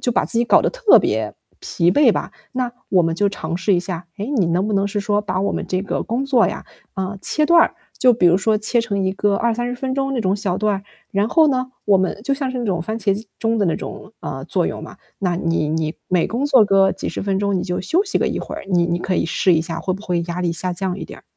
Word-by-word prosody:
就 245 - 0
把 - - +2
自 230 - -2
己 235 - +3
搞 - - +5
得 - - +1
特 - - +5
别 - - -1 0.3
疲 170 0 +1
惫 250 +3 +5
吧。 - - -3 0.2
那 250 -2 -2 0.2
我 185 -2 +4
们 165 0 0
就 205 +3 +2
尝 165 -4 -4
试 190 +2 +2
一 175 - +2
下， 175 -1 -5
诶， 205 - -3
你 215 -12 +2
能 175 +4 +1
不 215 - -2
能 200 0 +2
是 205 +1 -2
说 205 +1 +1
把 190 -2 -2
我 200 - 0
们 - - -3
这 185 0 0
个 200 - -2
工 245 +4 -2
作 260 -4 +3
呀， - - -5 0.3
嗯， 190 +1 -3
切 305 -1 +1
断。 340 0 +5 0.2
就 250 - +5
比 205 -6 +3
如 175 +1 +5
说 215 +2 +1
切 230 +2 +1
成 200 -3 -2
一 190 0 0
个 200 +1 +1
20-30 240 +1 -1
分 260 +1 -3
钟 275 0 -1
那 255 - -1
种 195 -1 +1
小 190 -3 -2
段， 210 -2 0 0.3
然 200 +1 +1
后 320 +1 +5
呢， 255 -2 -1 0.2
我 200 - +5
们 190 +1 -1
就 275 +4 0
像 275 -2 -2
是 255 - -4
那 240 - -2
种 180 -5 0
番 220 +6 -4
茄 200 -3 +1
机 215 +3 -6
钟 225 0 0
的 210 - +2
那 170 - +1
种， - - -8
嗯， - - -5
作 - - 0
用 - - -4
嘛。 - - -10 0.2
那 180 -3 0
你 165 -3 0
你 155 0 -1
每 180 -2 +2
工 245 +5 -2
作 270 -5 +5
个 195 -1 +4
几 - - -5
10 - - -4
分 195 -1 0
钟 200 -1 0
你 180 - -1
就 180 -2 -2
休 345 - +1
息 400 - 0
个 - - +1
一 - - -3
会 - - -6
儿， - - -7
你 175 -2 +3
你 170 0 0
可 185 +1 -2
以 - - +1
试 170 +2 +2
一 160 - +2
下 165 0 -5
会 185 +1 -1
不 195 - -9
会 180 -4 -1
压 170 +1 -4
力 170 -1 0
下 180 +2 -3
降 185 +1 -3
一 - - -5
点 - - -11
儿。 - - -18
200 Hz, 300 characters per minute, -20 LUFS, 180-235 Hz, 0.3 s, 搞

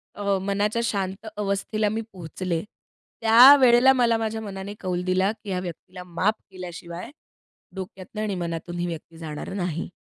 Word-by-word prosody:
अ, 200 -1 0
मनाच्या 205 +3 0
शांत 195 -2 -2
अवस्थेला 210 +1 0
मी 220 +2 -2
पोहचले, 170 -1 -4 0.6
त्यावेळेला 250 +2 +8
मला 240 -3 +3
माझ्या 220 0 -2
मनाने 200 -1 -6
कौल 180 -2 -2
दिला, 185 +2 +2
की 215 -2 -11
ह्या 185 -1 -1
व्यक्तीला 180 +1 -8
माफ 180 +4 0 0.2
केल्याशिवाय 175 +1 -8 0.7
डोक्यातनं 190 +2 -7
आणि 210 -2 -1
मनातून 170 0 -4
ही 175 - 0
व्यक्ती 165 -1 -7
जाणार 155 +1 -6
नाही. 175 -4 -3
195 Hz, 145 wpm, -25 LUFS, 180-215 Hz, 0.7 s, त्यावेळेला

